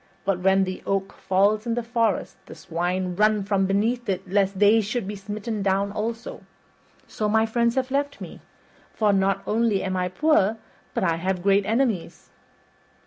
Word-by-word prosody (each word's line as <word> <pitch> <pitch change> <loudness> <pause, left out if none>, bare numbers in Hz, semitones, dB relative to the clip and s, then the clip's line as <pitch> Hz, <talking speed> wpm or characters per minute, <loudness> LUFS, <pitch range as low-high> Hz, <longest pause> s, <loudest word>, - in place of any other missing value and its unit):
But 195 -2 0
when 190 +1 +3
the 185 0 -4
oak 195 0 -1
falls 205 +4 +1
in 230 - 0
the 240 - -2
forest 230 -3 -1
the - - -10
swine 180 +2 -2
run 210 +1 +2
from 195 -1 +1
beneath 220 +4 0
it 190 0 -2
lest 195 0 +1
they 210 +3 +5
should 215 0 -3
be 205 - -4
smitten 210 +2 -5
down 195 +1 +1
also. 225 +3 -4 0.7
So 210 -1 -2
my 220 +1 +3
friends 235 +1 +1
have 260 0 -1
left 285 +1 -1
me; - - -9 0.5
for 210 -2 +2
not 195 0 +1
only 220 -2 +1
am 190 -1 -2
I 180 0 0
poor 225 - +2 0.4
but - - 0
I 165 -3 +1
have 180 +1 -2
great 200 0 +3
enemies." 225 -5 -1
205 Hz, 175 wpm, -24 LUFS, 190-225 Hz, 0.7 s, they